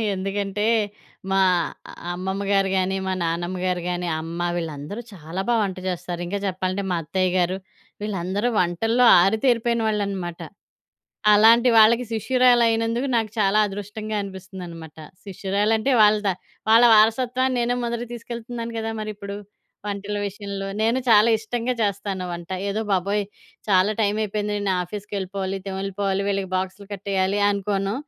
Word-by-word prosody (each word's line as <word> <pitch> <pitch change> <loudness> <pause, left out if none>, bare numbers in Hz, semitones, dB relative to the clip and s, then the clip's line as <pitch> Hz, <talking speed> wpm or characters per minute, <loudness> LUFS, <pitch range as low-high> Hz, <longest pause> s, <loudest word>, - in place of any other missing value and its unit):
ఎందుకంటే, 195 +1 -2 0.7
మా 195 0 +3 0.7
అమ్మమ్మ 190 +2 -3
గారు 195 -1 +3
గానీ, 190 +1 0
మా 190 - 0
నానమ్మ 175 +2 -2
గారు 180 -1 0
గానీ, 180 0 -2
అమ్మ 165 +2 -6 0.2
వీళ్ళందరూ 160 +5 -5
చాలా 170 +1 -5
బా - - +4
వంట 190 -2 -3
జేస్తారు. 175 -1 -4
ఇంగా 200 +3 -2
చెప్పాలంటే, 185 +1 -2
మా 175 - +1
అత్తయ్య 185 +4 0
గారు, 180 +1 +1 0.5
వీళ్ళందరూ 200 +2 -1
వంటల్లో 225 +8 +2 0.2
ఆరితేరిపోయిన 230 +4 +2
వాళ్ళనమాట. 195 -5 -3 0.9
అలాంటి 230 +4 +6
వాళ్ళకి 230 +3 +6
శిష్యురాలయినందుకు 235 0 +2
నాకు 225 -2 0
చాలా 205 0 +3
అదృష్టంగా 210 +2 -5
అనిపిస్తుందనమాట. 180 -5 -9 0.3
శిష్యురాలంటే, 205 +5 0
వాళ్ళ 210 0 +6
త - - +4 0.4
వాళ్ళ 225 +2 +7
వారసత్వాన్ని 250 +4 +2
నేనే 240 +1 +1
మొదటికి 235 0 -3
తీసుకెళ్తున్నాను 235 0 -6
గదా 225 0 -2
మరిప్పుడు 205 -1 -6 0.5
వంటల 205 0 -3
విషయంలో. 200 0 -5
నేను 225 +3 +2
చాలా 220 0 +6
ఇష్టంగా 235 +3 -2
చేస్తాను 200 -2 -1
వంట. 170 0 -7 0.2
ఏదో 205 +2 -1
బాబోయ్! 200 +2 +1 0.4
చాలా 190 +1 +4
టైమయిపోయింది, 210 0 0
నేను 200 -2 0
ఆఫీస్‌కెళ్ళిపోవాలి, 195 0 -4
తెమిళిపోవాలి, 195 0 -2
వీళ్ళకి 195 -2 -1
బాక్సులు 190 +2 -4
కట్టేయాలి 195 0 -1
అనుకోను. 200 0 -1
200 Hz, 125 wpm, -23 LUFS, 190-220 Hz, 0.9 s, వాళ్ళ